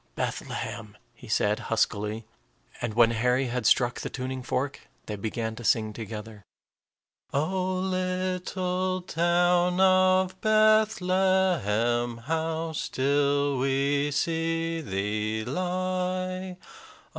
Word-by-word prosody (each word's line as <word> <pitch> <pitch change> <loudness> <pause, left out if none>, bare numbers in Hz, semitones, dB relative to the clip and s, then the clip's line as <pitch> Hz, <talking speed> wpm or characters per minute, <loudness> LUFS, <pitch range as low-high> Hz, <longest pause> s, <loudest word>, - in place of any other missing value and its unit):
"Bethlehem," 105 -2 -4 0.2
he 125 - -14
said, 105 0 +1
huskily. 110 -1 0 0.6
And 120 -3 -3
when 115 -1 +5
Harry 125 +3 +1
had 125 +1 -1
struck 120 -1 +3
the - - -4
tuning 130 0 -4
fork, 135 +2 -3 0.2
they 105 - -4
began 110 +2 -3
to 120 - -8
sing 110 -1 +2
together, 110 -1 -8 0.9
"O 185 +6 0
little 185 0 -1
town 175 +1 +2
of 185 0 +4
Bethlehem, 185 - +2
How 160 +5 -2
still 140 -1 +1
we 140 +2 +1
see 165 +2 -1
thee 105 0 -2
lie! 185 +3 -2
145 Hz, 100 wpm, -27 LUFS, 115-185 Hz, 0.9 s, when